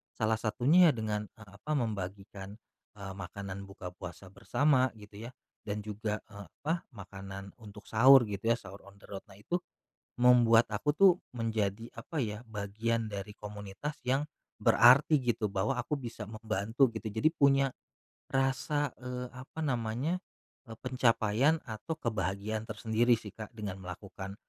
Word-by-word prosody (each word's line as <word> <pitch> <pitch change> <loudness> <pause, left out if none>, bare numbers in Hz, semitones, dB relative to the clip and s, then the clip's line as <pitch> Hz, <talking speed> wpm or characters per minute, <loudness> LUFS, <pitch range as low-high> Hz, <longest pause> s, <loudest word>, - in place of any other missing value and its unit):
salah 110 0 +1
satunya 145 +11 +5
dengan 105 -1 -2
eee, 105 -2 -14
apa 155 - -5
membagikan, 100 -3 -4 0.4
eee, 100 -1 -6
makanan 100 +1 -6
buka 90 -2 -8
puasa 90 +1 -9
bersama 130 +5 +2
gitu 105 +1 -10
ya - - -14 0.4
dan 105 +1 -2
juga 105 0 -3
eee, 100 -1 -10 0.2
apa 165 +3 -1
makanan 95 -1 -8
untuk 105 -1 -12
sahur 130 +4 +8
gitu 100 +2 -5
ya - - +1
sahur 100 +1 -12
on 100 - -14
the - - -15
road 100 -1 -6
nah - - -13
itu, 175 +12 -1 0.6
membuat 120 -2 +6
aku 145 +8 0
tuh 195 -1 +8 0.2
menjadi 110 -1 -1
apa 145 +6 -3
ya, 105 +2 -5
bagian 110 +2 -2
dari 100 0 -6
komunitas 105 +7 -6
yang, 135 +3 +2 0.4
berarti 140 +6 +7
gitu 115 -3 0
bahwa 100 +7 0
aku 150 - -2
bisa 115 -4 -6
membantu 110 +3 +1
gitu 110 0 -4
jadi 110 +9 +3
punya, 140 -3 +4 0.6
rasa 135 +1 +1
eee, 125 0 -4
apa 130 +5 -9
namanya 125 +6 -1 0.5
eee, 115 - -8
pencapaian 125 +3 +2
atau 110 +8 -4
kebahagiaan 105 - -2
tersendiri 115 +2 +2
sih, 105 - -9
Kak, 110 -1 -8
dengan 105 -4 -5
melakukan, 95 +1 -7
110 Hz, 145 wpm, -31 LUFS, 100-125 Hz, 0.6 s, sahur